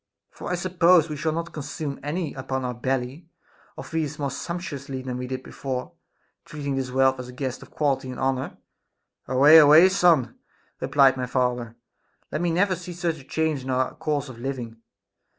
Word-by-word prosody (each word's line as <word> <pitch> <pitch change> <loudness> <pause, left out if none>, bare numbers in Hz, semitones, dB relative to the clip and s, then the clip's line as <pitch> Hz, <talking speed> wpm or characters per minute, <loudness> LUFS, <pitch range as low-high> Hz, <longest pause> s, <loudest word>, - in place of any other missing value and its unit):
For - - -8
I - - +1
suppose 175 -2 +3
we 150 - -4
shall 155 +2 -1
not 165 +1 -4
consume 150 -1 -5
any 155 +1 -3
upon 130 0 -3
our 125 - -2
belly, 130 +6 -3 0.5
or - - -6
feast 155 -2 -3
more 140 -2 -2
sump 175 0 -4
tuously 140 -6 -6
than 125 -1 -3
we 125 0 -4
did 130 0 -5
before, 130 -2 -5 0.5
treating 145 -2 -4
this 130 -1 -2
wealth 130 0 +2
as 125 - -6
a - - -8
guest 130 0 -4
of - - -13
quality 140 -3 -1
and 125 - -7
honor! 130 0 -1 0.7
Away, 140 +5 +7
away, 155 +5 +8
son, 170 - +3 0.4
replied 135 -2 +4
my 125 -1 -2
father; 125 -2 -1 0.6
let 150 - -2
me 175 - +1
never 185 +3 +2
see 180 0 -8
such 170 -2 -2
a - - -16
chancre 160 0 -1
in 130 - -8
our 130 0 0
course 145 -2 -2
of 125 -3 -10
living. 120 -3 -5
140 Hz, 185 wpm, -25 LUFS, 130-160 Hz, 0.7 s, away